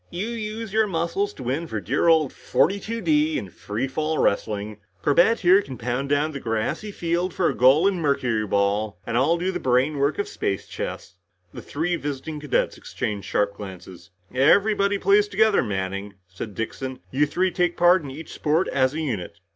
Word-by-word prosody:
"You 190 Hz, +6 st, -4 dB
use 220 Hz, -2 st, -5 dB
your 220 Hz, 0 st, +3 dB
muscles 180 Hz, +3 st, -1 dB
to -, -, -8 dB
win 135 Hz, +7 st, -2 dB
for 110 Hz, -, -3 dB
dear 120 Hz, -, 0 dB
old 160 Hz, -4 st, +4 dB
42 210 Hz, +5 st, 0 dB
D 155 Hz, -3 st, +2 dB
in 95 Hz, -, -6 dB
free 110 Hz, +6 st, -4 dB
fall 155 Hz, +4 st, -2 dB
wrestling. 105 Hz, +1 st, -1 dB, 0.2 s
Corbett 175 Hz, +10 st, +4 dB
here 190 Hz, +2 st, +6 dB
can 130 Hz, -9 st, -9 dB
pound 125 Hz, +3 st, -2 dB
down 145 Hz, +2 st, +1 dB
the 140 Hz, -, -6 dB
grassy 115 Hz, -, -2 dB
field 175 Hz, 0 st, -2 dB
for 180 Hz, -, +2 dB
a -, -, -1 dB
goal 135 Hz, +9 st, +5 dB
in 190 Hz, -3 st, 0 dB
mercuryball, 110 Hz, -7 st, 0 dB
and 115 Hz, -, -3 dB
I'll 140 Hz, +8 st, +3 dB
do 180 Hz, +2 st, -1 dB
the -, -, -3 dB
brainwork 140 Hz, +3 st, +1 dB
of 205 Hz, -, -1 dB
space 100 Hz, -, -3 dB
chess." -, -, -6 dB, 0.4 s
The -, -, -8 dB
three 170 Hz, +4 st, -2 dB
visiting 145 Hz, +1 st, -5 dB
cadets 150 Hz, -2 st, -1 dB
exchanged 105 Hz, -2 st, -4 dB
sharp 100 Hz, 0 st, +1 dB
glances. 90 Hz, -3 st, -10 dB, 0.2 s
"Everybody 200 Hz, +9 st, +3 dB
plays 200 Hz, +2 st, +4 dB
together, 210 Hz, +1 st, +3 dB
Manning," 100 Hz, 0 st, -4 dB
said 95 Hz, +3 st, -8 dB
Dixon. 130 Hz, +3 st, -5 dB
"You 145 Hz, +3 st, +2 dB
three 185 Hz, +5 st, 0 dB
take 175 Hz, -2 st, 0 dB
part 175 Hz, +1 st, +5 dB
in 145 Hz, -, -7 dB
each 150 Hz, +5 st, -9 dB
sport 160 Hz, +4 st, +1 dB
as 130 Hz, +1 st, +1 dB
a 160 Hz, -, -2 dB
unit." 110 Hz, -, -4 dB
150 Hz, 180 wpm, -24 LUFS, 115-180 Hz, 0.4 s, here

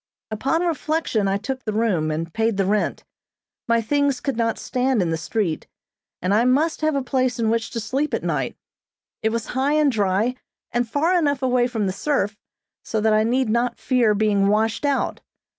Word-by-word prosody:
Upon 270 Hz, +10 st, 0 dB
reflection, 310 Hz, -, 0 dB
I 195 Hz, 0 st, +1 dB
took 255 Hz, +5 st, -5 dB
the 215 Hz, -, -3 dB
room, 205 Hz, -8 st, +1 dB
and 160 Hz, +2 st, -3 dB
paid 225 Hz, -2 st, 0 dB
the 195 Hz, -, +2 dB
rent. 210 Hz, +2 st, 0 dB, 0.6 s
My 230 Hz, 0 st, +3 dB
things 285 Hz, +2 st, +1 dB
could 275 Hz, -3 st, -2 dB
not 230 Hz, -1 st, 0 dB
stand 255 Hz, -1 st, 0 dB
in 175 Hz, -3 st, +1 dB
the -, -, +1 dB
street, 170 Hz, 0 st, -2 dB, 0.6 s
and 185 Hz, +2 st, +2 dB
I 220 Hz, +3 st, +4 dB
must 290 Hz, +7 st, +2 dB
have 310 Hz, -1 st, +1 dB
a 275 Hz, -, 0 dB
place 255 Hz, -1 st, 0 dB
in 225 Hz, -2 st, +1 dB
which 230 Hz, 0 st, -1 dB
to 235 Hz, -, -4 dB
sleep 270 Hz, +7 st, -1 dB
at -, -, -4 dB
night. -, -, -1 dB, 0.7 s
It 220 Hz, -, +2 dB
was 230 Hz, 0 st, -2 dB
high 270 Hz, +3 st, +1 dB
and 300 Hz, -2 st, +3 dB
dry, 210 Hz, +2 st, +1 dB, 0.4 s
and 240 Hz, -1 st, 0 dB
far 320 Hz, +8 st, +2 dB
enough 285 Hz, -4 st, 0 dB
away 250 Hz, -1 st, +3 dB
from 225 Hz, -4 st, -2 dB
the 190 Hz, -, -1 dB
surf, 210 Hz, -2 st, -1 dB, 0.5 s
so 220 Hz, -, -2 dB
that 220 Hz, 0 st, +3 dB
I 215 Hz, 0 st, +4 dB
need 250 Hz, +3 st, +1 dB
not 235 Hz, +2 st, 0 dB
fear 240 Hz, -5 st, +2 dB
being 205 Hz, -2 st, +2 dB
washed 220 Hz, +6 st, +1 dB
out. 280 Hz, -1 st, 0 dB
230 Hz, 195 wpm, -22 LUFS, 210-265 Hz, 0.7 s, I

